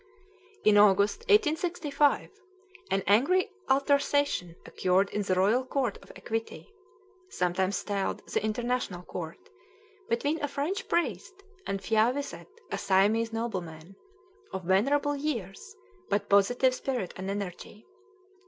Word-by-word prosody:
In 210 -1 +6
August, 200 0 +4
1865, 315 -6 +2 0.6
an 195 -1 0
angry 310 - +3 0.2
altercation 280 -9 +1
occurred 190 +2 +1
in 210 - -1
the 190 -2 0
Royal 210 +8 +3
Court 255 -5 -2
of - - -14
Equity 225 - -5 0.6
(sometimes 185 - 0
styled 200 -2 -3
the - - -1
International 220 -4 -2
Court) 165 -2 -6 0.7
between 290 +7 0
a - - +1
French 290 +8 -3
priest 375 +3 -2 0.2
and 195 -1 -2
Phya 225 +1 +3
Wiset, 285 0 -6 0.2
a - - -2
Siamese 210 +4 +2
nobleman, 185 -6 -5 0.6
of 190 - -5
venerable 275 +11 +2
years, 275 - -4 0.3
but 205 - -1
positive 245 +6 +4
spirit 250 -8 -3
and 190 +1 -5
energy. 200 +2 -6
225 Hz, 115 wpm, -28 LUFS, 195-285 Hz, 0.7 s, In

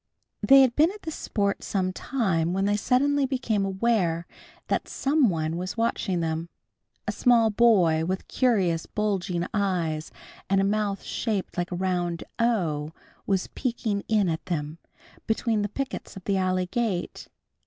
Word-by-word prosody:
They 270 +6 +7
had 250 -2 +2
been 310 +3 +5
at 415 +1 -12
this 320 - -4
sport 200 -7 -1
some 185 -2 -1
time, 180 -10 0
when 195 +1 0
they 205 +1 +2
suddenly 270 +5 +2
became 245 -6 0
aware 190 -4 0 0.4
that - - -1
some 275 -3 +2
one 160 -1 -1
was 185 +5 -4
watching 210 -5 0
them. 165 +1 -2 0.6
A - - +1
small 235 -3 +4
boy 190 -8 +4
with 185 +3 -3
curious 190 -10 +1
bulging 195 -4 -1
eyes, 175 -7 -1 0.4
and 195 0 +3
a - - +3
mouth 200 0 -1 0.2
open 205 -4 +1
like 175 0 -2
a - - -2
round 175 -2 -1 0.2
O 165 -10 0 0.3
was 190 -2 +1
peeking 225 -5 -2
in 210 -3 +2
at 160 -1 -2
them, 155 -2 -3 0.5
between 220 -1 +1
the 205 - -1
pickets 270 -2 -5
of 190 - -9
the 200 - 0
alley 185 -1 +1
gate. 200 -2 -2
195 Hz, 155 wpm, -26 LUFS, 175-230 Hz, 0.6 s, They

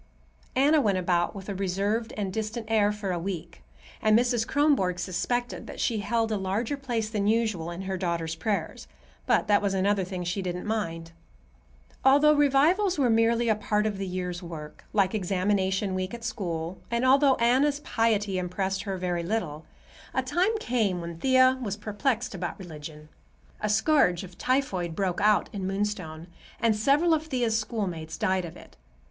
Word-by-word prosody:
Anna 290 +4 +4
went 205 -6 +2
about 175 -1 0
with 195 -1 -8
a 200 - -3
reserved 200 +4 -1
and 195 -3 -2
distant 220 +2 -3
air 210 -2 +4
for 210 -2 -3
a 175 - -1
week, 175 -2 -6 0.4
and 215 0 +5
Mrs. 240 -1 +1
Kronborg 275 -12 +2
suspected 240 +8 -2
that - - -8
she 225 -3 0
held 225 +2 0
a 215 - +1
larger 200 +8 -1
place 240 -6 -2
than 210 -2 -1
usual 215 -7 +1
in 175 +2 -6
her 190 0 -3
daughter's 170 -3 -2
prayers; 200 +5 -3 0.4
but - - +3
that 205 -1 +4
was 200 -1 0
another 195 +1 +2
thing 180 -1 -5
she 175 +3 -2
didn't 180 -1 -4
mind. 165 -7 -3 0.9
Although 285 +3 +6
revivals 300 +7 +3
were 255 -5 +3
merely 230 +1 +3
a 220 - +5
part 210 0 0
of 205 -2 -2
the 195 - -3
year's 180 -1 -4
work, 160 -4 -9
like 195 -2 +2
examination 190 0 0
week 185 +3 -3
at 235 - -10
school, 175 -6 -4
and 235 +2 0
although 270 +1 +5
Anna's 265 +5 +2
piety 215 -7 +1
impressed 190 +2 -2
her 195 -2 -4
very 180 -1 -1
little, 170 -5 -3 0.5
a 260 - +1
time 360 - +1
came 220 - 0
when 170 -1 -7
Thea 260 +1 +4
was 205 -4 -3
perplexed 220 +3 -1
about 175 -3 -4
religion. 155 -4 -10 0.5
A 210 - -1
scourge 210 - +3
of 180 -1 -11
typhoid 190 -11 -1
broke 185 -2 -1
out 210 0 +4
in 195 -2 -3
Moonstone 190 -5 -3 0.3
and 230 -2 +3
several 285 +10 +3
of 315 0 0
Thea's 245 -6 0
schoolmates 190 -8 -3
died 185 -1 0
of 165 - -9
it. - - -16
205 Hz, 175 wpm, -27 LUFS, 180-235 Hz, 0.9 s, Although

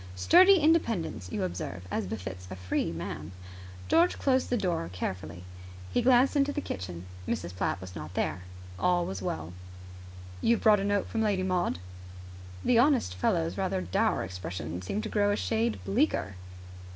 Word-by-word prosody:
Sturdy 365 - +7
independence, 235 - +1
you - - -2
observe, 85 -1 -4
as 105 - -1
befits 95 -2 -6
a 95 - -6
free 90 -2 -1
man. 85 -1 -6 0.5
George 345 +2 +4
closed 260 -1 +1
the 245 - +1
door 175 - -1
carefully. 90 -2 -5 0.5
He 245 - +3
glanced 255 +3 +4
into 285 0 +3
the 295 - -2
kitchen. 90 - -6 0.2
Mrs. 85 +1 -3
Platt 90 - -1
was 90 0 -9
not 80 +3 -7
there. 90 - -1 0.4
All 180 -1 +2
was 95 0 -5
well. 80 -1 -4 0.9
"You 235 - +4
have - - -6
brought 210 -2 +6
a - - -2
note 205 0 +1
from 225 - -2
Lady 205 -4 +1
Maud?" 180 - 0 0.9
The 240 -2 +5
honest 260 - +3
fellow's 90 0 0
rather - - 0
dour 90 0 0
expression 90 -2 -5
seemed 195 - -3
to 220 - -4
grow 205 -1 +2
a - - +2
shade 225 +2 0
bleaker. 205 - +1
100 Hz, 165 wpm, -29 LUFS, -, 0.9 s, Sturdy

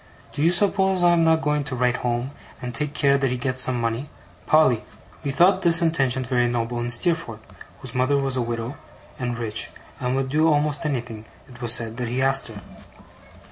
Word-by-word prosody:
do - - -5
you 165 - +4
suppose 190 0 +2
I 175 - +5
am 170 -1 +3
not 160 0 +3
going 150 0 0
to 135 -2 -4
write 125 0 +1
home, 120 +2 -2 0.3
and 125 -1 -6
take 150 +4 -3
care 140 -1 +3
that 135 -1 +1
he 125 - -2
gets 130 +1 +1
some 125 -1 +3
money? 115 +4 -3 0.4
Polly?' 140 -7 +4 0.4
We 140 - -2
thought 180 +7 +3
this 170 -2 +4
intention 135 -6 +1
very 125 -1 +1
noble 120 0 -2
in 120 0 -3
Steerforth, 120 -3 -1 0.4
whose 125 -2 -8
mother 130 +2 +1
was 135 -1 0
a 130 - 0
widow, 115 +2 -4 0.4
and 120 -2 -3
rich, 110 -3 -3 0.3
and 125 0 -1
would 135 0 -1
do 155 +3 +3
almost 150 +1 0
anything, 120 -6 -4 0.2
it 120 -1 -15
was 120 -1 +5
said, 115 0 -3
that 125 -1 -3
he 125 +3 -3
asked 135 0 +2
her. 105 -3 -11
130 Hz, 205 wpm, -23 LUFS, 120-150 Hz, 0.4 s, I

